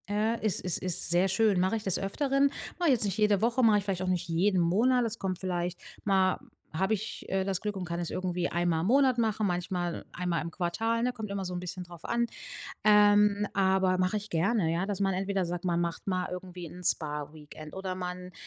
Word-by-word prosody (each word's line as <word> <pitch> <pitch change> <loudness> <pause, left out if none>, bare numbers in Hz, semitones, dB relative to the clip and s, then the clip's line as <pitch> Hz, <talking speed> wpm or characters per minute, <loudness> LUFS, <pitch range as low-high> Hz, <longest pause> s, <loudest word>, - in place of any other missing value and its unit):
Ja, 215 +3 +1
es 215 -3 0
es 180 -3 -1
ist 180 -1 -3
sehr 175 +2 +4
schön. 195 0 +3
Mache 185 +4 +2
ich 215 - -7
des 190 -4 0
Öfteren. 275 +7 +1 0.3
Mache 345 -3 +3
ich - - +6
jetzt 230 -4 0
nicht 200 0 -2
jede 210 -2 +3
Woche, 240 +3 +2
mache 220 -2 +6
ich - - -5
vielleicht 190 -2 -2
auch 185 - -2
nicht 180 -1 0
jeden 180 +3 +2
Monat. 230 +9 +3
Es 225 0 -4
kommt 185 -2 -2
vielleicht 180 -1 -2 0.2
mal 190 -2 +2 0.3
habe 190 +6 +1
ich, 215 +1 -4
äh, 190 0 0
das 190 -1 -1
Glück 210 -1 -3
und 190 - -4
kann 170 -1 -3
es 170 - -3
irgendwie 180 -1 -1
einmal 175 -1 0
im 165 - -1
Monat 260 +1 +4
machen, 220 -2 +1
manchmal 175 -1 -2
einmal 175 -2 -1
im 170 - -5
Quartal, 225 +8 -1
ne, 250 - +2
kommt 220 -4 -6
immer 200 -1 -3
so 180 -1 -4
'n 175 - -3
bisschen 180 +1 -5
drauf 175 -2 -12
an. 235 0 +1 0.6
Ähm, 210 -1 +5
aber 190 -1 +3
mache 185 +3 +1
ich 210 0 -5
gerne, 185 +2 +1
ja, 170 +3 0
dass 200 -1 -3
man 195 -1 +1
entweder 195 0 0
sagt, 175 0 -4
man 170 -1 +1
macht 170 +2 -3
mal 185 -1 0
irgendwie 180 -1 -7
'n 180 +3 -10
Spa-Weekend 150 -1 -2
oder 190 -1 -4
man, 180 0 -6
190 Hz, 225 wpm, -29 LUFS, 175-210 Hz, 0.6 s, ich